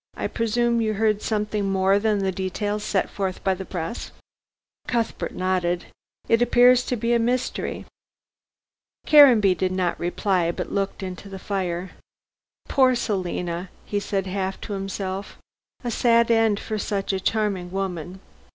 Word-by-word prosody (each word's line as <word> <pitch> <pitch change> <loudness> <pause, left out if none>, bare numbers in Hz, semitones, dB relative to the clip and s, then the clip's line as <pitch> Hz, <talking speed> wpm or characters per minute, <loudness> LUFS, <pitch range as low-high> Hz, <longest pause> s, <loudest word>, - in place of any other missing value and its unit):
I - - -3
presume 235 +1 +1
you 215 -1 0
heard 215 0 +1
something 210 -2 -1
more 195 +1 +3
than 215 0 +1
the 195 -1 0
details 205 +3 -3
set 200 -2 0
forth 190 -2 -4
by 190 - +2
the 190 +1 -6
press." 175 +4 -5 0.8
Cuthbert 230 -2 -2
nodded. 180 -1 0 0.4
"It 230 +1 +3
appears 245 +1 +5
to 250 - 0
be 235 +1 0
a 235 - +3
mystery." 245 +2 -1 1.2
Caranby 250 -10 +7
did 185 0 -1
not 185 -2 -1
reply, 175 0 0
but - - -5
looked 195 -1 -2
into 185 +1 -7
the 195 - -7
fire. 185 -2 -3 0.8
"Poor 260 -2 +4
Selina!" 180 -5 -2 0.2
he 205 - -1
said 195 -1 -2
half 190 0 -3
to 210 - -5
himself. 195 0 -4 0.5
"A 240 - -2
sad 235 0 +3
end 225 -2 +3
for 215 -1 -4
such 200 -1 -2
a 190 - 0
charming 200 -3 -1
woman." 185 -1 -4
200 Hz, 150 wpm, -24 LUFS, 185-225 Hz, 1.2 s, Caranby